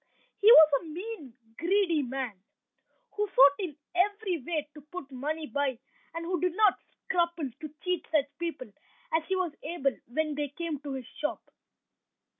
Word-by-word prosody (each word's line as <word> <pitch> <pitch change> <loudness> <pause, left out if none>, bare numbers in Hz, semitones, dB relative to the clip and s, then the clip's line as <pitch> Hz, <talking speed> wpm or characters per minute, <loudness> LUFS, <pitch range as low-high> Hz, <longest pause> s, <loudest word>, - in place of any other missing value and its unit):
He 425 +3 +8
was 315 -9 +10
a - - -12
mean, 330 - -7 0.2
greedy 345 -3 +2
man, 255 -7 -4 0.7
who 420 0 0
sought 280 -6 +7
in 335 -7 -4 0.2
every 385 0 +1
way 305 +1 -2
to 300 - -12
put 295 -1 -9
money 300 +5 -3
by, 285 -4 -1 0.4
and 335 0 -4
who 355 -1 -1
did 360 -1 +1
not 420 -2 +4 0.3
scruple 340 -6 0
to 305 -1 -8
cheat 360 -2 -1
such 300 -3 +3
people 340 +9 -4 0.4
as 320 0 +3
he 380 - +1
was 365 -4 -1
able 285 -4 -1
when 305 +5 -1
they 290 0 -2
came 315 0 -4
to 285 -1 -6
his 260 -2 -5
shop. 300 +5 -4
315 Hz, 165 wpm, -29 LUFS, 285-360 Hz, 0.7 s, was